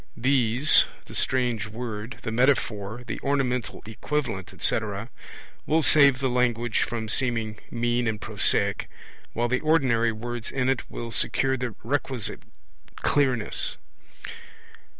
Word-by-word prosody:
These, 125 +2 +4 0.2
the - - -11
strange 120 -5 0
word, 110 +1 -6
the 115 - -3
metaphor, 120 -3 0
the - - -5
ornamental 125 -4 -1
equivalent, 110 -3 -3
etc.. 110 +2 -2 0.6
will 160 +1 +3
save 140 -4 +6
the 135 +1 0
language 120 -2 +1
from 115 -2 -2
seeming 115 -2 -1
mean 120 0 0
and 110 -1 -1
prosaic, 105 -3 0 0.4
while 120 +1 0
the 130 +2 +1
ordinary 130 -8 +2
words 120 +1 -5
in 130 -1 0
it 135 -3 -1
will 115 -1 -6
secure 130 +3 +2
the 125 -4 -4
requisite 130 -2 -2 0.5
clearness. 130 -7 0
120 Hz, 120 wpm, -26 LUFS, 110-130 Hz, 0.6 s, save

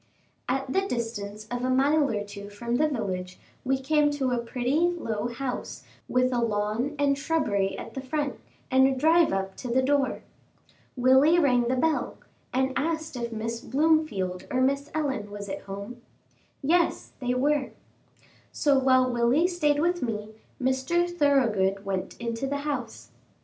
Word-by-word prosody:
At 265 +1 -1
the 385 - +3
distance 225 - -4
of 245 0 -2
a 255 - 0
mile 280 +3 +3
or 205 -2 -1
two 205 0 -9
from 235 +4 -2
the 310 - +3
village, 185 -9 -3 0.3
we 265 +1 +1
came 295 +2 +2
to 265 -3 -1
a 245 - +1
pretty, 245 +4 -1
low 330 -11 0
house, 245 +1 -5 0.3
with 255 0 +2
a 245 - +1
lawn 225 +5 -1
and 285 -1 +2
shrubbery 225 -10 0
at - - -8
the 265 - -5
front, 285 +1 -3 0.3
and 265 +1 +6
a 270 - 0
drive 320 +5 +4
up 195 0 -2
to 255 - -6
the 255 +2 +2
door. 275 -1 +1 0.7
Willie 265 +6 +5
rang 250 -7 +3
the 255 - +1
bell, 310 +4 0 0.3
and 265 +1 +1
asked 315 +1 -2
if 235 -1 -4
Miss 230 +1 -3
Blomefield 265 - 0
or 255 - 0
Miss 275 +2 +1
Ellen 270 -9 -1
was 205 0 -7
at 195 0 -5
home. 200 +5 -7 0.6
Yes, 335 +4 +1
they 250 -2 -1
were. 285 +1 +1 0.8
So, 280 -2 +3
while 260 -1 +4
Willie 245 +6 +2
stayed 320 -5 +1
with 350 +2 +1
me, 215 -3 -3 0.3
Mr. 265 +7 +1
Thoroughgood 230 - +2
went 190 -1 -3
into 235 +2 -3
the 285 +1 -1
house. 295 -2 -4
260 Hz, 160 wpm, -27 LUFS, 230-290 Hz, 0.8 s, and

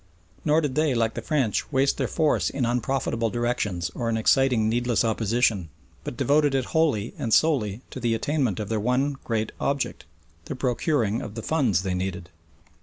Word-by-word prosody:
Nor 155 +1 +3
did 145 -4 -2
they, 150 -2 +1
like 115 -1 +1
the - - -5
French, 135 -9 -1
waste 135 +1 +2
their - - +1
force 155 -3 +1
in 135 -3 -1
unprofitable 120 -1 0
directions 105 -8 -1
or 115 -1 -2
in 115 - 0
exciting 120 -1 +3
needless 120 +1 +1
opposition, 110 -4 +1 0.3
but 120 - -6
devoted 140 +1 +3
it 130 -2 +1
wholly 140 -10 +1
and 115 - -2
solely 120 -8 +2
to - - -6
the 115 -2 +1
attainment 130 - -1
of 105 - -3
their 110 +1 -1
one 130 +5 0
great 110 -2 -1
object 140 -9 -2 0.4
the - - -5
procuring 125 -3 0
of 105 - -7
the 115 - -5
funds 120 - +1
they 95 -2 -1
needed. 90 -1 -4
120 Hz, 180 wpm, -25 LUFS, 110-135 Hz, 0.4 s, Nor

